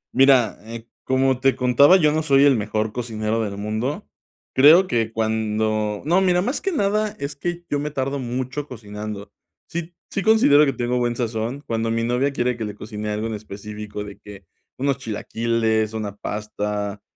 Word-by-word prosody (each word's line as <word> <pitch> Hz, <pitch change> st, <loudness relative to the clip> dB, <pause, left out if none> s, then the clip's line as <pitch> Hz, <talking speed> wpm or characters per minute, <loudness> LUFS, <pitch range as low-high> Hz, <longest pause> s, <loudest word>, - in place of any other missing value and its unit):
Mira, 130 Hz, -5 st, +4 dB
eh, 115 Hz, 0 st, -8 dB, 0.2 s
como 130 Hz, 0 st, +2 dB
te 135 Hz, 0 st, +3 dB
contaba, 130 Hz, +8 st, +5 dB
yo 155 Hz, -5 st, +3 dB
no 155 Hz, +1 st, 0 dB
soy 140 Hz, -3 st, +4 dB
el 140 Hz, -2 st, +6 dB
mejor 110 Hz, 0 st, -1 dB
cocinero 115 Hz, -2 st, -2 dB
del 100 Hz, -2 st, -4 dB
mundo. 110 Hz, -, -3 dB, 0.5 s
Creo 155 Hz, +8 st, +7 dB
que 115 Hz, -9 st, -1 dB
cuando 110 Hz, -1 st, -1 dB
no, 175 Hz, +5 st, +3 dB
mira, 180 Hz, -1 st, +3 dB
más 255 Hz, +6 st, -2 dB
que 390 Hz, -, -1 dB
nada 210 Hz, -, 0 dB
es 140 Hz, +1 st, -5 dB
que 175 Hz, +3 st, -4 dB
yo 145 Hz, -, -1 dB
me 150 Hz, +1 st, -2 dB
tardo 140 Hz, -1 st, -2 dB
mucho 130 Hz, +3 st, -4 dB
cocinando. 105 Hz, -3 st, -7 dB, 0.4 s
Sí 170 Hz, +1 st, -6 dB, 0.2 s
sí, 200 Hz, -, -1 dB
considero 190 Hz, -10 st, +5 dB
que 135 Hz, -, 0 dB
tengo 125 Hz, +1 st, -1 dB
buen 120 Hz, -1 st, 0 dB
sazón 115 Hz, +2 st, -3 dB
cuando 115 Hz, 0 st, -1 dB
mi 115 Hz, 0 st, 0 dB
novia 125 Hz, +4 st, +1 dB
quiere 125 Hz, -2 st, 0 dB
que 115 Hz, -2 st, -4 dB
le 105 Hz, -, -6 dB
cocine 105 Hz, 0 st, -6 dB
algo 105 Hz, +1 st, -2 dB
en 115 Hz, -, -3 dB
específico, 105 Hz, 0 st, -7 dB
de 100 Hz, -1 st, -10 dB
que 100 Hz, -2 st, -12 dB, 0.3 s
unos 140 Hz, +1 st, 0 dB
chilaquiles, 110 Hz, -1 st, -1 dB
una 105 Hz, -2 st, -4 dB
pasta, 105 Hz, -1 st, -4 dB
120 Hz, 180 wpm, -22 LUFS, 110-140 Hz, 0.5 s, Creo